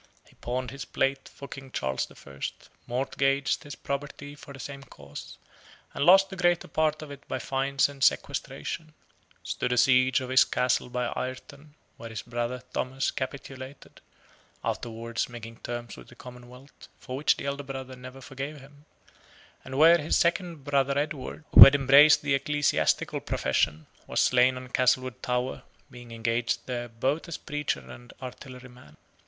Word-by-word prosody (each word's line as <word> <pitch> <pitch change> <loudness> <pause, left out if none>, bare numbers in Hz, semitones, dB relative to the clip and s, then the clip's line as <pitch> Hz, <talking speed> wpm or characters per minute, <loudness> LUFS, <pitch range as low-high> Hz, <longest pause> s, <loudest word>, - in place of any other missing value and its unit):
He - - -22
pawned 125 +1 -4
his 140 0 -6
plate 135 0 -1
for 140 - -10
King 135 -1 -9
Charles 65 - -2
the - - -17
First, 70 0 -8 0.2
mortgaged 135 +2 0
his 145 -1 -8
property 145 +1 -5
for 145 -1 -13
the 135 - -11
same 140 +2 -7
cause, 70 - -11 0.6
and - - -1
lost 195 +4 +6
the - - -5
greater 175 -1 +1
part 155 -1 0
of 150 - -9
it 140 0 -10
by - - -2
fines 135 +1 +1
and 140 -1 -6
sequestration: 155 -1 -1 0.5
stood 125 - -2
a 125 - +1
siege 130 +1 +4
of 130 -1 -6
his 130 - +7
castle 125 0 0
by 125 0 -2
Ireton, 140 +3 -7 0.2
where 115 - -8
his 110 - -6
brother 120 +1 -3
Thomas 130 +2 -1
capitulated 130 0 -7 0.6
(afterward 115 0 -3
making 115 -1 -9
terms 120 -1 -6
with - - -13
the 120 - -16
Commonwealth, 125 +2 -13
for 130 - -7
which 145 +3 +2
the - - -6
elder 140 0 -2
brother 135 -2 -7
never 130 +1 -11
forgave 140 +3 -6
him), 145 +2 -17 0.8
and 130 +1 -6
where 165 +3 +7
his 150 +1 +1
second 170 -3 0
brother 140 -1 +1
Edward, 150 0 -4
who - - +14
had 135 - +8
embraced 145 +2 +7
the 145 -1 +1
ecclesiastical 145 +1 +1
profession, 80 0 0 0.2
was - - -1
slain 125 +1 +4
on 125 0 -9
Castlewood 130 0 +1
Tower, 125 +1 -2 0.3
being 120 -1 -12
engaged 115 +1 -1
there 120 -1 -4
both 135 +9 -1
as 170 - -5
preacher 150 -1 -3
and 120 0 -13
artilleryman. 125 - -11
130 Hz, 160 wpm, -27 LUFS, 125-140 Hz, 0.8 s, who